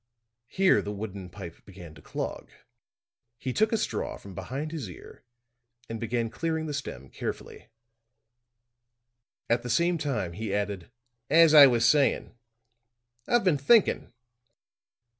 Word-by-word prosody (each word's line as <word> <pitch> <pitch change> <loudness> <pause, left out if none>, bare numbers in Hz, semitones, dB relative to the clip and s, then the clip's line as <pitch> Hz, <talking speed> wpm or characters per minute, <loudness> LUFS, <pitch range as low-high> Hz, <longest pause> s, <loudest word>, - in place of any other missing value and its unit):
Here 190 +7 +3
the 105 - -5
wooden 100 -3 -6
pipe 85 -3 -9
seemed 90 -4 -12
to - - -15
clog; - - -5 0.9
he 130 +2 -4
took 220 - +2
a 225 - +2
straw - - -3
from 100 - -12
behind 130 - -5
his 145 - -5
ear 90 - -13 0.6
and 115 0 -5
began 115 0 -2
clearing 160 -1 -2
the 150 - -4
stem 70 - -6
carefully. - - -6 1.8
At 120 0 +1
the 125 - -7
same 170 +7 +2
time 110 - -2
he 105 +1 -3
added: 100 -3 -3 0.4
"As 165 +1 +6
I 145 -2 +11
was 120 -3 +3
saying, 145 -5 +2 0.9
I've 240 -1 +3
been 170 -7 +2
thinking." 210 - +3
120 Hz, 135 wpm, -27 LUFS, 100-155 Hz, 1.8 s, I